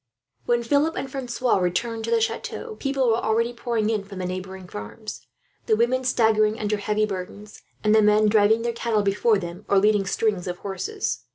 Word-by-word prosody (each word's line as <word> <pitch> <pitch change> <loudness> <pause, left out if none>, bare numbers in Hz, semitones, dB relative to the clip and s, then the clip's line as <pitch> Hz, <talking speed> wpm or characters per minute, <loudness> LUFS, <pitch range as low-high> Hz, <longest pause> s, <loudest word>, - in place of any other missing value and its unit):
When 240 0 +2
they 235 +5 +2
returned 245 - -1
to - - -4
the 230 0 +3
chateau, 435 - -3
people 275 -2 0
were 225 - +3
already 230 +2 +1
pouring 230 -2 -1
in 215 -3 -1
from 200 -1 -10
the 185 - -3
neighbouring 185 0 -6
farms; 125 - -8 0.4
the 220 - +4
women 245 +3 +1
staggering 220 -3 +2
under 210 0 0
heavy 210 +1 0
burdens, 200 +1 -7 0.2
and 210 0 +3
the 220 - +6
men 210 0 +4
driving 215 +1 +4
their 235 0 -1
cattle 230 -2 0
before 205 +2 +2
them, 175 +1 -7
or 200 - +4
leading 205 0 +3
strings 200 -3 0
of 180 0 -3
horses. 400 - -4
215 Hz, 180 wpm, -24 LUFS, 200-235 Hz, 0.4 s, the